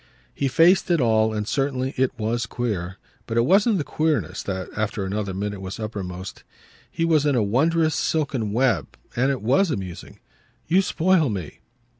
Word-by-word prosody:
He 140 Hz, -, -1 dB
faced 170 Hz, +9 st, +4 dB
it 170 Hz, -2 st, +3 dB
all, 110 Hz, -3 st, +3 dB
and 105 Hz, -1 st, -3 dB
certainly 135 Hz, -1 st, -1 dB
it 130 Hz, 0 st, +1 dB
was 115 Hz, +1 st, -1 dB
queer. 100 Hz, -7 st, -3 dB, 0.3 s
But 115 Hz, -, -2 dB
it 115 Hz, -, +4 dB
wasn't 200 Hz, -, +4 dB
the 155 Hz, -, -1 dB
queerness 150 Hz, -, -1 dB
that 95 Hz, -2 st, -4 dB
after 105 Hz, -2 st, -2 dB
another 100 Hz, +1 st, -2 dB
minute 100 Hz, +1 st, -4 dB
was 95 Hz, +2 st, -6 dB
uppermost. 95 Hz, -4 st, -6 dB, 0.5 s
He 165 Hz, -, -1 dB
was 160 Hz, -3 st, +3 dB
in 145 Hz, -2 st, +2 dB
a 115 Hz, -, +2 dB
wondrous 155 Hz, +9 st, +2 dB
silken 140 Hz, -11 st, -1 dB
web, 120 Hz, -4 st, 0 dB, 0.2 s
and 130 Hz, +3 st, +2 dB
it 135 Hz, -5 st, -2 dB
WAS 140 Hz, -, +3 dB
amusing. 95 Hz, -, -6 dB, 0.5 s
"You 180 Hz, +4 st, +3 dB
spoil 180 Hz, -4 st, +2 dB
me!" 95 Hz, -8 st, -5 dB
120 Hz, 170 wpm, -23 LUFS, 105-155 Hz, 0.5 s, faced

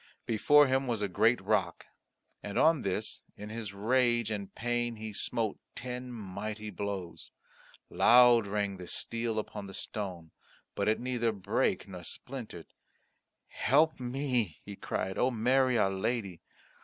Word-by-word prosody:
Before 145 Hz, +6 st, +5 dB
him 135 Hz, 0 st, +1 dB
was 115 Hz, -4 st, -1 dB
a -, -, +1 dB
great 110 Hz, +6 st, +3 dB
rock 95 Hz, -6 st, 0 dB, 0.6 s
and 100 Hz, -, -5 dB
on 160 Hz, -3 st, +4 dB
this 100 Hz, +2 st, -2 dB
in 105 Hz, +1 st, -8 dB
his 110 Hz, -2 st, -5 dB
rage 120 Hz, +2 st, +2 dB
and 100 Hz, -2 st, -4 dB
pain 120 Hz, 0 st, -1 dB
he 110 Hz, 0 st, -7 dB
smote 110 Hz, +1 st, -1 dB, 0.2 s
ten 125 Hz, +1 st, -5 dB
mighty 105 Hz, 0 st, -6 dB
blows. 95 Hz, -2 st, -4 dB, 0.6 s
Loud 120 Hz, -2 st, +6 dB
rang 100 Hz, -1 st, -1 dB
the 90 Hz, -1 st, -9 dB
steel 115 Hz, +2 st, -2 dB
upon 105 Hz, -1 st, -4 dB
the 95 Hz, -, -8 dB
stone; 90 Hz, -6 st, -5 dB, 0.4 s
but -, -, -1 dB
it 110 Hz, -, +2 dB
neither 120 Hz, -2 st, 0 dB
brake 100 Hz, -1 st, 0 dB
nor 90 Hz, -2 st, -9 dB
splintered. 115 Hz, -7 st, -7 dB, 0.8 s
"Help 155 Hz, +3 st, +2 dB
me," 125 Hz, -, -1 dB
he 100 Hz, -, -7 dB
cried, 95 Hz, 0 st, -3 dB
"O 125 Hz, -, +4 dB
Mary, 130 Hz, +2 st, +3 dB
our 95 Hz, -, +3 dB
Lady. 100 Hz, -2 st, -2 dB
110 Hz, 145 wpm, -31 LUFS, 100-125 Hz, 0.8 s, Loud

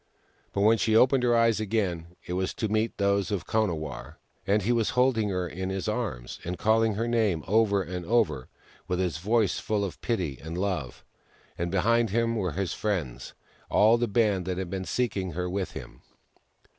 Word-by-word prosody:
But 100 Hz, -, -1 dB
when 110 Hz, +2 st, +5 dB
she 110 Hz, -, +2 dB
opened 130 Hz, +3 st, +5 dB
her 120 Hz, -1 st, +3 dB
eyes 115 Hz, -2 st, +3 dB
again, 95 Hz, -6 st, -2 dB
it 90 Hz, -, -4 dB
was 95 Hz, +1 st, -2 dB
to 110 Hz, -, -1 dB
meet 110 Hz, +2 st, 0 dB
those 100 Hz, -2 st, +1 dB
of 95 Hz, -4 st, -2 dB
Konawarr; 80 Hz, -, -2 dB, 0.3 s
and 100 Hz, 0 st, +2 dB
he 115 Hz, -, +1 dB
was 115 Hz, -3 st, +2 dB
holding 125 Hz, -5 st, +3 dB
her 90 Hz, -2 st, -1 dB
in 95 Hz, +4 st, -4 dB
his 95 Hz, 0 st, -3 dB
arms 105 Hz, -, -3 dB
and 90 Hz, +1 st, -4 dB
calling 110 Hz, +2 st, +2 dB
her 115 Hz, +3 st, -1 dB
name 110 Hz, -9 st, +1 dB
over 100 Hz, -1 st, +3 dB
and 90 Hz, 0 st, -5 dB
over, 110 Hz, -, +1 dB, 0.4 s
with 90 Hz, -, -1 dB
his 90 Hz, -4 st, -1 dB
voice 105 Hz, +1 st, +1 dB
full 105 Hz, -2 st, -1 dB
of 95 Hz, -, -8 dB
pity 90 Hz, -, -2 dB
and 80 Hz, +2 st, -5 dB
love; 90 Hz, -10 st, -3 dB, 0.5 s
and 85 Hz, 0 st, -2 dB
behind 115 Hz, +5 st, +2 dB
him 115 Hz, +3 st, +1 dB
were 95 Hz, -7 st, -1 dB
his 95 Hz, +1 st, -2 dB
friends 90 Hz, -, -3 dB, 0.2 s
— -, -, -31 dB
all 110 Hz, +3 st, +5 dB
the 120 Hz, -, +1 dB
band 100 Hz, -4 st, +1 dB
who 90 Hz, -, -1 dB
had 95 Hz, -1 st, -4 dB
been 95 Hz, -1 st, -3 dB
seeking 100 Hz, -8 st, -1 dB
her 90 Hz, +2 st, -2 dB
with 95 Hz, +1 st, -3 dB
him. -, -, -9 dB
100 Hz, 195 wpm, -27 LUFS, 90-110 Hz, 0.5 s, when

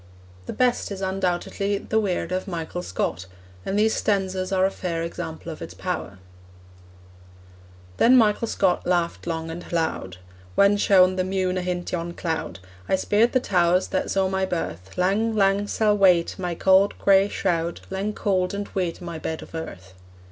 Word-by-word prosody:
The -, -, -4 dB
best 250 Hz, -4 st, +1 dB
is 195 Hz, -1 st, -5 dB
undoubtedly 190 Hz, +1 st, -1 dB
The 220 Hz, +2 st, 0 dB
Weird 190 Hz, -4 st, -1 dB
of 185 Hz, +2 st, -2 dB
Michael 175 Hz, -1 st, -4 dB
Scott, 95 Hz, -, -3 dB, 0.4 s
and 195 Hz, -, -2 dB
these 220 Hz, +1 st, +3 dB
stanzas 190 Hz, -2 st, -1 dB
are 190 Hz, -1 st, +3 dB
a 195 Hz, -, +1 dB
fair 170 Hz, -4 st, -3 dB
example 165 Hz, 0 st, -6 dB
of 155 Hz, -, -10 dB
its 85 Hz, -, -8 dB
power: 90 Hz, -1 st, -4 dB, 1.8 s
Then 255 Hz, +3 st, +6 dB
Michael 225 Hz, 0 st, +3 dB
Scott 190 Hz, -5 st, +1 dB
laughed 175 Hz, -1 st, 0 dB
long 165 Hz, -1 st, -3 dB
and 175 Hz, +2 st, -8 dB
loud: 160 Hz, -, -2 dB, 0.4 s
'Whan 200 Hz, +1 st, +5 dB
shone 185 Hz, -2 st, +4 dB
the 185 Hz, -, +1 dB
mune 185 Hz, -1 st, -1 dB
ahint 180 Hz, -1 st, -3 dB
yon 170 Hz, -1 st, -3 dB
cloud 160 Hz, -, -3 dB, 0.3 s
I -, -, +4 dB
speered 210 Hz, +5 st, +2 dB
the 255 Hz, -, +4 dB
towers 180 Hz, -5 st, +2 dB
that 185 Hz, -, -1 dB
saw 195 Hz, -1 st, +1 dB
my 190 Hz, 0 st, -1 dB
birth 95 Hz, -, -4 dB
Lang, 210 Hz, +5 st, +1 dB
lang, 200 Hz, 0 st, +2 dB
sall 210 Hz, 0 st, +2 dB
wait 180 Hz, -4 st, +4 dB
my 175 Hz, -2 st, -2 dB
cauld 190 Hz, +3 st, +4 dB
grey 195 Hz, 0 st, +4 dB
shroud, 170 Hz, -4 st, -1 dB
Lang 195 Hz, +2 st, -2 dB
cauld 190 Hz, -2 st, 0 dB
and 200 Hz, 0 st, -4 dB
weet 180 Hz, -3 st, -3 dB
my 170 Hz, -2 st, -6 dB
bed 160 Hz, 0 st, -4 dB
o' -, -, -11 dB
earth!' 95 Hz, -, -7 dB
185 Hz, 170 wpm, -24 LUFS, 170-200 Hz, 1.8 s, Then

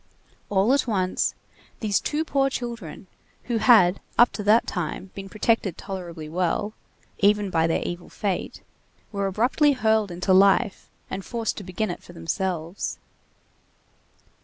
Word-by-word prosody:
All 205 Hz, +5 st, +3 dB
at 280 Hz, -2 st, +1 dB
once, 185 Hz, -5 st, 0 dB, 0.4 s
these 210 Hz, -3 st, +1 dB
two 310 Hz, +2 st, -2 dB
poor 275 Hz, -2 st, +2 dB
children, 235 Hz, -, -6 dB, 0.4 s
who 240 Hz, -2 st, -1 dB
had 210 Hz, -6 st, +5 dB, 0.2 s
up 240 Hz, -, +6 dB
to -, -, -5 dB
that 210 Hz, +3 st, +4 dB
time 180 Hz, +1 st, -4 dB
been 195 Hz, 0 st, -8 dB
protected 215 Hz, -3 st, 0 dB
tolerably 175 Hz, -5 st, -7 dB
well, 180 Hz, +5 st, -1 dB, 0.5 s
even 205 Hz, -1 st, +3 dB
by 165 Hz, -1 st, +2 dB
their 165 Hz, -, 0 dB
evil 175 Hz, 0 st, -6 dB
fate, 200 Hz, -4 st, -3 dB, 0.5 s
were 200 Hz, -2 st, -1 dB
abruptly 250 Hz, -, +3 dB
hurled 220 Hz, -4 st, +2 dB
into 180 Hz, +2 st, 0 dB
life 195 Hz, +2 st, +3 dB, 0.2 s
and 190 Hz, 0 st, -4 dB
forced 230 Hz, 0 st, -2 dB
to 205 Hz, -, -6 dB
begin 185 Hz, +2 st, -2 dB
it -, -, -7 dB
for -, -, -14 dB
themselves. 170 Hz, -, -3 dB
200 Hz, 140 wpm, -25 LUFS, 180-225 Hz, 0.5 s, up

